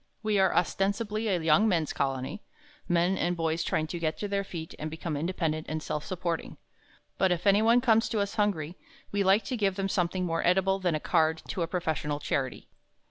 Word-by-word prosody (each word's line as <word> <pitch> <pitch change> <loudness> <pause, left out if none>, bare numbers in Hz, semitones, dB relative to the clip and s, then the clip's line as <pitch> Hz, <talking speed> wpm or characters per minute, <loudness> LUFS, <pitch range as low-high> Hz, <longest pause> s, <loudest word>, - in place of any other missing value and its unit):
We 215 -2 +2
are 190 - +4
ostensibly 205 +5 0
a 185 -4 +1
young 160 +6 +4
men's 165 -7 +1
colony 135 +7 -2 0.5
men 175 +2 +2
and 175 0 0
boys 165 0 0
trying 155 - 0
to 170 +2 -5
get 160 -1 -1
to 205 - -3
their 200 0 -1
feet 165 -4 -7
and 155 - -3
become 160 0 -4
independent 155 0 -2
and 155 0 -3
self 150 - -3
supporting. 170 -3 -3 0.6
But 190 -1 +3
if 175 +1 -1
anyone 220 +4 +5
comes 225 -2 +3
to 220 - -1
us 200 +1 -1
hungry, 185 -7 -1 0.3
we 205 0 +1
like 195 +3 +4
to 255 - -2
give 200 -4 +1
them 195 0 -2
something 180 0 0
more 165 -1 -1
edible 190 +2 +3
than 175 -4 0
a - - -1
card 160 0 +1
to 185 - -3
a 165 - 0
professional 155 -4 -2
charity. 135 -3 -2
180 Hz, 200 wpm, -28 LUFS, 160-200 Hz, 0.6 s, anyone